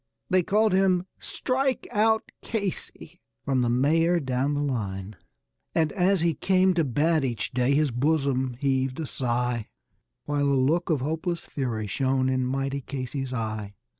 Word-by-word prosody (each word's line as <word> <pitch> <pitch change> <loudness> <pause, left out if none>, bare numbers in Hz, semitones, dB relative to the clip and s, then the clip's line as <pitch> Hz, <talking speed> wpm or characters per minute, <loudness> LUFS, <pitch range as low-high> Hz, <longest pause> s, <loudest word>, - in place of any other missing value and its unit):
They 185 0 +5
called 210 +3 +2
him 185 -2 +3
"Strike 265 0 -1
out 220 +1 +2
Casey" 205 -5 -5 0.2
from 130 -2 +1
the 120 - +1
mayor 165 +8 +3
down 135 0 -1
the 145 - 0
line. 100 -7 -3 0.6
And 160 -2 +2
as 190 -1 +2
he 170 -1 +2
came 185 +4 +3
to 170 -2 +2
bat 150 +3 +1
each 120 -4 -2
day 125 +2 +2
his 150 -2 +2
bosom 130 -1 +1
heaved 135 0 0
a 160 - -2
sigh, 120 -3 -1 0.6
While 145 -1 0
a 140 - +3
look 160 +8 +1
of 150 -6 +1
hopeless 160 +4 -2
fury 120 -6 -3
shone 130 +4 0
in 130 -1 0
mighty 135 +1 -2
Casey's 135 0 -4
eye. 110 -4 -4
140 Hz, 155 wpm, -26 LUFS, 125-170 Hz, 0.6 s, They